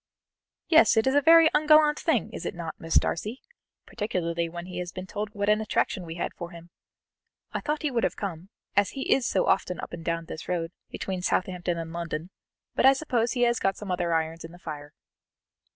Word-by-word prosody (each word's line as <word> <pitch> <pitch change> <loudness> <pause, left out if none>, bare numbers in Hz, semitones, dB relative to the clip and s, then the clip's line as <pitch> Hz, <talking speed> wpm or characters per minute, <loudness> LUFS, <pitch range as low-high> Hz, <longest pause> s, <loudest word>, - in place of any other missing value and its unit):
"Yes, 320 -7 +6
it 220 - +4
is 265 - +3
a 285 - +5
very 330 +2 +8
ungallant 305 0 +5
thing, - - 0
is - - -6
it - - -4
not, 165 -2 -5
Miss 165 0 -3
Darcy? 215 +9 +1 0.5
particularly 170 -6 -2
when 170 +1 -7
he 180 -1 -6
has 175 0 -4
been 185 0 -7
told 210 +2 -4
what 200 0 -1
an 210 +1 +4
attraction 200 -3 -1
we 165 - -6
had 175 - -3
for 175 - -7
him. 170 0 -13 0.8
I - - -2
thought 300 0 -2
he 300 - 0
would 235 -2 0
have - - +1
come, 185 -2 -5 0.3
as 205 -1 +3
he 270 - +2
is 260 -2 +1
so 190 - +1
often 185 -1 +1
up - - -7
and 165 - -6
down 165 0 -2
this 160 - -8
road, 170 -2 -1 0.2
between 190 -2 -4
Southampton 180 -1 -1
and 165 -1 -5
London, 170 0 -4 0.4
but - - +1
I 270 - +8
suppose 245 -5 0
he 245 -2 +1
has 240 -1 +3
got 195 -1 0
some 205 -3 -6
other 175 -1 0
irons 165 0 -1
in 165 +1 -9
the - - -12
fire." 150 -4 -8
185 Hz, 215 wpm, -27 LUFS, 170-235 Hz, 0.8 s, very